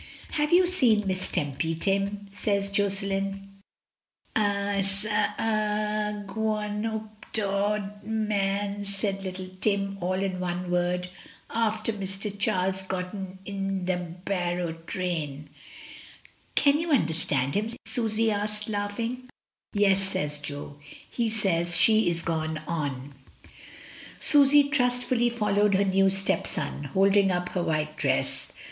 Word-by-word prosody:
"Have 300 0 0
you 360 +1 +6
seen 250 - +4
Miss 185 -1 -1
Tempy, 150 +3 -1
Tim?" 200 +3 -1
says 200 -1 -1
Josselin. 195 0 -1 0.8
"I 200 -1 +1
s^ 195 +1 -1
err 210 0 0
a 210 -1 -1
gwoan 210 0 -2
oop 220 -1 -6
t' 220 - 0
Auld 205 +1 -1
Mann," 205 -2 -1
says 195 0 -2
little 185 0 -5
Tim, 195 -1 0
all 180 +1 0
in 190 -1 -2
one 180 0 -3
word, 180 0 0 0.4
"aafter 220 -1 0
Mr. 195 0 -4
Charles 190 -1 +1
gotten 190 0 -5
into 195 -2 -2
t' 180 - -4 0.2
Barrow 175 -3 -1 0.2
train." 150 -6 -3 1.0
"Can 285 +1 +4
you 335 - -2
imderstand 160 - +1
him?" 215 +2 0 0.2
Susy 225 -1 +1
asked, 210 +1 -2
laughing. 230 +5 -3 0.4
"Yes," 200 -2 +3
says 150 -6 -2
Jo. 145 0 -7 0.3
"He 235 -2 0
says 175 -6 +3
she 215 +2 +5
is 170 0 -1
gone 160 -1 -1
on." 145 -4 -3 1.1
Susy 290 0 +7
trustfully 245 -3 +2
followed 210 -3 +2
her 200 +1 +3
new 195 0 +3
stepson, 195 -6 +3
holding 195 +6 +3
up 180 -1 -1
her 180 - -2
white 155 -2 -1
dress. - - 0
200 Hz, 125 wpm, -27 LUFS, 180-215 Hz, 1.1 s, Susy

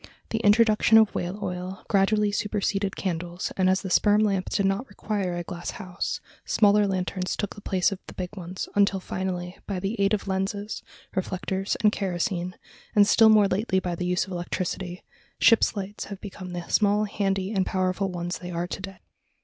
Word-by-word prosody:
The 225 - 0
introduction 220 0 +5
of 220 -2 +5
whale 180 +3 -3
oil 180 0 -5
gradually 205 +1 +3
superseded 200 -1 -1
candles 175 -1 -3
and 185 -1 +3
as 190 +2 +2
the 190 - -4
sperm 210 +3 +4
lamp 195 -3 +1
did 200 - +1
not 195 +7 0
require 195 -5 -2
a 175 - -3
glass 175 0 -6
house, 185 -4 -3 0.2
smaller 205 -1 +4
lanterns 185 -1 -2
took 205 - -3
the 205 - -12
place 190 -2 +1
of 195 - -5
the - - -10
big 185 +2 -5
ones, 185 -1 -5
until 200 -1 +3
finally, 180 -1 -4
by 195 -3 -2 0.2
aid 200 +2 +3
of 200 - -7
lenses, 200 +2 -2 0.3
reflectors, 190 +1 -2
and 210 - +6
kerosene, 180 -2 -2 0.4
and 205 -1 +7
still 225 0 +6
more 210 -2 +6
lately 195 0 +1
by 180 -2 -3
the 180 +1 -3
use 180 0 +1
of 190 - -11
electricity, 180 0 -3 0.4
ship's 230 -1 +5
lights 200 +1 -5
have 200 -2 -8
become 185 -3 -8
the 175 -1 -5
small, 210 0 +3
handy, 195 -1 -1
and 190 -3 +1
powerful 185 +1 0
ones 175 -1 -4
they 180 - -7
are 170 0 -2
to 180 - -6
day. 195 -1 -7
195 Hz, 185 wpm, -26 LUFS, 180-205 Hz, 0.4 s, and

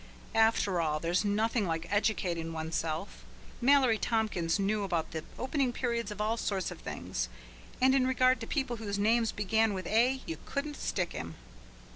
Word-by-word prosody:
After 220 -5 +3
all, 155 -2 0
there's 170 +4 +1
nothing 215 +1 +1
like 165 0 -2
educating 175 -6 0
oneself. 160 +2 -3 0.4
Mallory 255 -4 +5
Tompkins 210 -8 0
knew 205 +1 0
about 170 -5 -1
the 160 -1 -4
opening 265 0 0
period 235 -3 -2
of 210 -1 -7
all 220 +2 0
sorts 195 -5 -1
of - - -8
things, - - -4 0.5
and 260 +1 +5
in 260 -1 +3
regard 255 -1 +3
to 225 - -6
people 265 -5 -1
whose 205 -2 -3
names 225 +2 +3
began 215 +1 +1
with 185 -1 -4
"A" 250 +6 +2
you 330 - -4
couldn't 290 +1 -3
stick 180 -3 -1
him. 85 -1 -6
215 Hz, 165 wpm, -31 LUFS, 175-240 Hz, 0.5 s, Mallory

